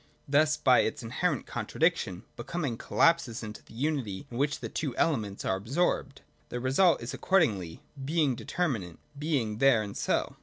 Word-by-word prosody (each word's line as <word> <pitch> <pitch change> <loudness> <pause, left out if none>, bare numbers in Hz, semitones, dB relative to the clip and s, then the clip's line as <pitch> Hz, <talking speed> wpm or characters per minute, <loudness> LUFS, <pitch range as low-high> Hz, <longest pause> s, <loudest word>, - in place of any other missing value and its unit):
Thus 150 +2 +3
by 130 -2 +5
its 110 +2 0
inherent 115 - -1
contradiction - - -1
Becoming 150 -9 -3
collapses 140 -3 +2
into 105 -1 -7
the - - -16
unity 130 -6 -2
in 120 - -5
which 145 +1 +1
the - - -4
two 140 -6 -3
elements 110 -11 0
are 95 - +1
absorbed. 135 - -1 0.3
This 120 - -3
result 135 +4 +3
is 120 - -5
accordingly 105 - +1 0.2
Being 150 -1 +2
Determinate, 115 - -2 0.2
(Being 130 -9 -1
there 135 -5 +5
and 100 -1 -7
so.) - - -1
130 Hz, 155 wpm, -29 LUFS, 110-155 Hz, 0.3 s, by